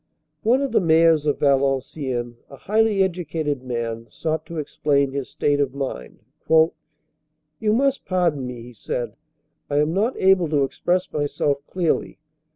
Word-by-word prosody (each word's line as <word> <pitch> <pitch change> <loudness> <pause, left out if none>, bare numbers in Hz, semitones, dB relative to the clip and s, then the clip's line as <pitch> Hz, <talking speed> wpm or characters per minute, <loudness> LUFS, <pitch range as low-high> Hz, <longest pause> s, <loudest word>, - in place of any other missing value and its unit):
One 250 +5 +3
of 275 - -2
the 230 - +3
mayors 160 -2 +4
of 145 - +1
Valenciennes, 135 -3 0 0.2
a 140 - -10
highly 210 +5 +2
educated 160 -6 -2
man, 115 -2 -4
sought 155 +2 -3
to 170 - -7
explain 140 -2 0
his 140 -1 -4
state 145 -1 0
of 140 -2 0
mind. 130 - -5 0.3
"You 155 +2 -1
must 275 +4 +1
pardon 170 -8 0
me," 120 -2 -7
he 125 +1 -12
said. - - -4 0.5
"I 145 - 0
am 150 +2 +2
not 215 +7 0
able 190 -3 +4
to 145 -2 +2
express 180 +6 -1
myself 145 -1 0
clearly. 175 -3 -1
150 Hz, 150 wpm, -22 LUFS, 140-180 Hz, 0.5 s, mayors